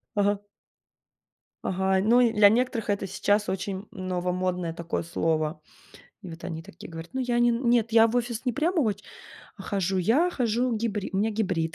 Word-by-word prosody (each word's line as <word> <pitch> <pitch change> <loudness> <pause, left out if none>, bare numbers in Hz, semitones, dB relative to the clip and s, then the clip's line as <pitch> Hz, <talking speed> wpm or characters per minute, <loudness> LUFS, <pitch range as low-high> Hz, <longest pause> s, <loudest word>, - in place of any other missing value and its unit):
Ага. 205 0 +2 1.2
Ага, 190 0 +1
ну 235 +4 +4
и 235 -2 +4
для 210 -2 +6
некоторых 230 0 +1
это 200 -1 0
сейчас 205 +2 0
очень 195 +1 -3
новомодное 180 -1 -2
такое 170 0 -3
слово. 160 -1 -1 0.6
И 185 - -8
вот 165 0 -10
они 165 -1 -5
такие 170 - -12
говорят: 165 0 -8
"Ну, 265 - -1
я 245 -1 0
не 240 0 +4
н 235 +1 0
нет, 230 -2 +2
я 225 0 +7
в 230 - -3
офис 240 0 -2
не 250 - 0
прям 325 - 0
оч 210 -7 0 0.5
а - - -9
хожу 195 -2 -1
я, 240 - +3
хожу 240 -3 0
гибри 210 -3 -2
у - - -2
меня 215 +3 +1
гибрид". 185 -7 -1
205 Hz, 185 wpm, -26 LUFS, 180-235 Hz, 1.2 s, я